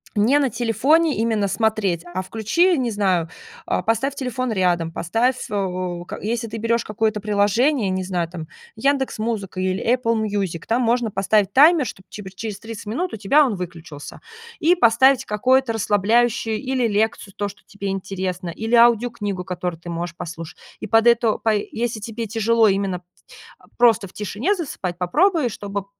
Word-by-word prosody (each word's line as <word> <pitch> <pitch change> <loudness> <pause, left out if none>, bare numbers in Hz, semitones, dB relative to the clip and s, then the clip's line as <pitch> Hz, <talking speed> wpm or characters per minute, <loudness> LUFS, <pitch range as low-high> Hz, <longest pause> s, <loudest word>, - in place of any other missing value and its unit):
не 225 +8 +4
на 275 -4 +1
телефоне 260 +8 +2
именно 220 -2 +1
смотреть, 205 -6 0
а 175 +1 -4
включи, 230 - +1
не 250 -3 -1
знаю, 185 -6 0 0.4
а, - - -1
поставь 230 +5 0
телефон 255 -2 -3
рядом. 175 -5 +1
Поставь, 230 +11 -1
э, 185 -3 -3
как - - -8
если 230 +1 -2
ты 225 - -6
берёшь 230 +1 0
какое-то 215 0 -1
приложение, 210 +4 +1
не 185 0 -1
знаю, 180 -2 -2
там, 165 -3 -8 0.3
"Яндекс 275 -1 0
Музыка" 215 -4 -3
или 185 +1 -1
Apple 230 -2 +1
Music, 195 -6 -3
там 240 +3 +1
можно 235 -1 +1
поставить 200 +1 +1
таймер, 295 - +5
чтоб, 190 -2 -10
типа, 205 -2 -8
через 210 0 -5
30 225 -2 -9
минут 330 - -2
у - - -8
тебя 220 +9 +4
он 250 -7 0
выключился. 165 -5 -8 0.4
И 340 +4 +4
поставить 260 -2 +4
какое-то 255 +3 +2
расслабляющую 225 +2 +1
или 255 -3 0
лекцию, 210 -1 -1
то, 205 - -2
что 200 - -12
тебе 200 -1 -7
интересно, 185 -2 -4
или 225 +7 -1
аудиокнигу, 230 -5 +2
которую 180 -2 -4
ты 175 - -9
можешь 170 0 -4
послуш 165 -1 -8 0.2
И - - -6
под 225 +1 +3
это, 235 -2 +3
пай 215 -2 0
если 230 -1 -2
тебе 225 +1 -5
тяжело 225 +1 +2
именно 195 -2 0
т 180 - -34 0.7
просто 230 -4 +4
в - - -20
тишине 215 - -1
засыпать, 225 - -5
попробуй, 310 - +2
чтобы 200 -1 -5
215 Hz, 170 wpm, -21 LUFS, 190-240 Hz, 0.7 s, таймер